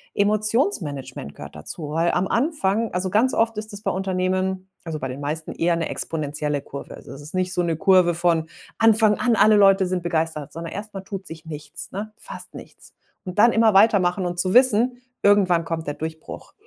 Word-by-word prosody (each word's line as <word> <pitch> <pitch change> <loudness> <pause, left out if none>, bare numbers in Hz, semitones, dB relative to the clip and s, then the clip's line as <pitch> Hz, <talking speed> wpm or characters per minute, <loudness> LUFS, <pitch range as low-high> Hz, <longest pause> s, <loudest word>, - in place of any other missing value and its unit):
Emotionsmanagement 205 - 0
gehört - - -10
dazu, 145 - -7
weil 165 +2 +1
am 180 +2 0
Anfang 230 - 0
also, 185 +1 -1
ganz 225 +7 +2
oft 225 -1 +1
ist 215 0 -6
das 205 - -8
bei 195 - -1
Unternehmen, 185 0 -1
also, 160 -3 -5
bei 130 - -3
den 130 +1 -7
meisten, 155 +2 -4
eher 170 0 +1
'ne 165 -1 -2
exponentielle 150 -2 -3
Kurve. 140 0 -9
Also, - - -13
es 140 - -10
ist 150 +2 -9
nicht 185 0 -1
so 180 - 0
'ne 165 -1 0
Kurve 185 -1 +4
von 170 -1 +1 0.3
Anfang 220 -1 +4
an, 240 -2 +2
alle 215 0 +5
Leute 195 -2 +5
sind 180 -1 -2
begeistert, 160 -3 -2
sondern 165 0 -7
erst 210 +1 -7
mal 195 - -5
tut 195 0 -7
sich 160 0 -10
nichts, 150 -2 -7
ne, 210 +3 -5
fast - - -10
nichts. - - -13 0.3
Und 185 +1 -5
dann 235 +2 +6
immer 225 -2 +4
weitermachen 195 -3 +4
und 175 0 -3
zu 185 +1 +1
wissen: 250 0 +4 0.2
„Irgendwann 185 -5 +4
kommt 165 -2 -4
der 145 - -2
Durchbruch.“ 160 0 -8
185 Hz, 200 wpm, -23 LUFS, 160-210 Hz, 0.3 s, dann